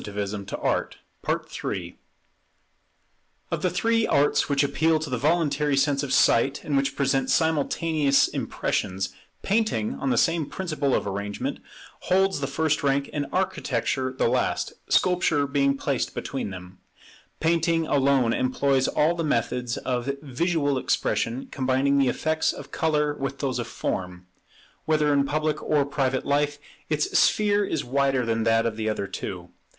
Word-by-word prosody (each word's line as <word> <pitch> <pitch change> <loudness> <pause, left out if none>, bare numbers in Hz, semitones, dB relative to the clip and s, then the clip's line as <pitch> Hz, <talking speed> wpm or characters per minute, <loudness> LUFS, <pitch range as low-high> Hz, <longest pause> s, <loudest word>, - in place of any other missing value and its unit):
[Painting 100 -1 -4
Sculpture - - -1 0.3
Architecture] - - -3 1.6
Of - - -2
the - - +2
three 230 0 +1
arts 145 +1 +2
which 140 0 +3
appeal 160 +3 +2
to 155 -3 -5
the 125 - 0
voluntary 150 -2 +1
sense 140 0 +2
of 140 -3 -4
sight, 135 +4 +3
and 145 - -2
which 135 0 +1
present 135 -1 +1
simultaneous 155 -2 +2
impressions, 95 +1 -2 0.3
Painting, 200 - 0
on 135 - -3
the 120 - +1
same 165 +2 +2
principle 155 -7 -1
of - - -1
arrangement, 100 +1 -4 0.4
holds 190 -1 +1
the 135 - -2
first 155 +2 0
rank, 140 0 0
and 145 -1 -2
Architecture 130 -7 -1
the 130 - 0
last; 125 +1 0 0.2
Sculpture 180 -5 +2
being 140 0 +1
placed 135 -2 -2
between 135 -6 -4
them. 90 0 -10 0.6
Painting 165 0 +2
alone 135 -5 +2
employs 130 +1 +1
all 155 +3 +2
the 170 -1 -3
methods 125 -3 -1
of 125 0 -2
visual 145 0 0
expression, 125 0 -1
combining 135 +1 +1
the 135 - +3
effects 160 +4 0
of - - -10
colour 150 -2 +1
with 135 -1 -4
those 130 -3 -2
of 120 - -3
form. 90 -4 -4 0.6
Whether 150 -2 +2
in 140 -1 +3
public 155 +2 -1
or 150 -2 +1
private 135 -2 -1
life, 145 +1 +1 0.3
its 150 -1 -1
sphere 205 -1 +3
is 160 -6 -2
wider 135 0 +1
than 115 -1 0
that 115 0 +3
of 110 -2 -2
the 110 -1 -1
other 105 -2 -2
two. 90 -2 -6
140 Hz, 150 wpm, -25 LUFS, 125-155 Hz, 1.6 s, which